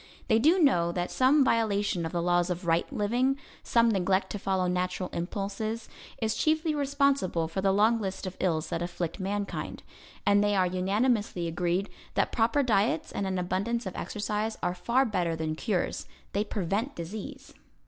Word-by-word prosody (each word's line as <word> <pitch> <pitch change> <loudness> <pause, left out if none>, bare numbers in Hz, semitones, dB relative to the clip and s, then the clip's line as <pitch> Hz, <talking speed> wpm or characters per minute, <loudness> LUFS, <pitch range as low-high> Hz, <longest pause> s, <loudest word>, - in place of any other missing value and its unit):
They 220 -1 +5
do 315 +10 +5
know 175 - +3
that 175 0 -2
some 270 +3 +4
violation 205 -7 +1
of - - -7
the 170 -1 -1
laws 175 0 +2
of 180 +1 -3
right 165 0 +1
living, 245 +6 +1 0.2
some 235 0 +3
neglect 190 -2 +1
to 205 - -4
follow 190 -1 0
natural 180 0 -1
impulses, 205 +5 -3 0.3
is 220 -1 0
chiefly 315 0 +1
responsible 280 - +1
for 180 +4 -3
the 195 0 +3
long 220 +3 +3
list 195 0 -4
of 185 0 -5
ills 160 -4 0
that 165 - -2
afflict 175 +1 -3
mankind. 200 +1 -3 0.4
And 205 0 +4
they 205 0 +2
are 185 -1 +3
unanimously 195 +1 0
agreed 175 +4 0 0.3
that - - +1
proper 230 +5 +2
diets 205 -7 +1
and 200 - -2
an 190 0 -1
abundance 195 +6 -1
of 190 - -5
exercise 210 +1 -2
are 175 - +1
far 240 +8 +2
better 180 -7 0
than 160 -1 -2
cures; 185 +3 -2 0.3
they 205 - +1
prevent 210 - -2
disease. 185 +5 -7
200 Hz, 170 wpm, -28 LUFS, 180-225 Hz, 0.4 s, They